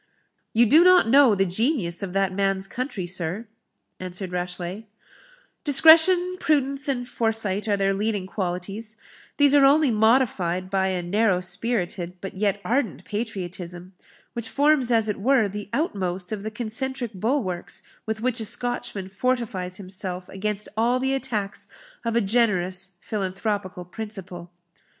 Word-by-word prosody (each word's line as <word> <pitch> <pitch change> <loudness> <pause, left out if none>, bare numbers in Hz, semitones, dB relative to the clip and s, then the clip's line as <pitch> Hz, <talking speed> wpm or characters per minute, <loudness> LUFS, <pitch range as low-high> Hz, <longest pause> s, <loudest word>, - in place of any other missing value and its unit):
"You 235 +2 +4
do 305 +9 +6
not 365 -8 +6
know 265 -4 +6
the 195 0 +2
genius 190 - -1
of 195 -2 -4
that 195 -1 +1
man's 195 0 0
country, 235 -4 -4
sir," 180 +4 -1 0.5
answered 185 0 -5
Rashleigh; 180 +3 -4 0.8
"discretion, 335 +5 +6
prudence, 280 -1 +1
and 245 -3 -2
foresight, 225 -4 -1
are 205 -1 +2
their 195 0 +1
leading 205 -1 -1
qualities; 195 +3 -4 0.4
these 285 -1 +5
are 285 -1 +6
only 280 0 +5
modified 210 -6 +2
by 190 -1 +1
a 185 -2 -2
narrow 195 +1 +2
spirited, 185 -3 -2
but 195 +1 -7
yet 200 +1 0
ardent 215 - -1
patriotism, 185 -4 -5 0.4
which 235 -1 -4
forms 285 -3 +2
as 225 -2 +3
it 210 - -2
were 250 -1 +3
the 205 +1 -7
outmost 190 - -2
of 215 -2 -3
the 215 - -4
concentric 240 +2 -3
bulwarks 195 -3 -1 0.2
with 220 0 -3
which 250 0 0
a 220 - -2
Scotchman 240 -4 -1
fortifies 195 -4 -2
himself 185 -1 -5
against 210 +1 -3
all 235 +3 +2
the 265 +1 0
attacks 225 -7 -2 0.4
of 230 -1 -2
a 235 - +4
generous 190 -4 +1
philanthropical 195 -2 -3
principle. 185 -3 -8
210 Hz, 140 wpm, -24 LUFS, 185-245 Hz, 0.8 s, do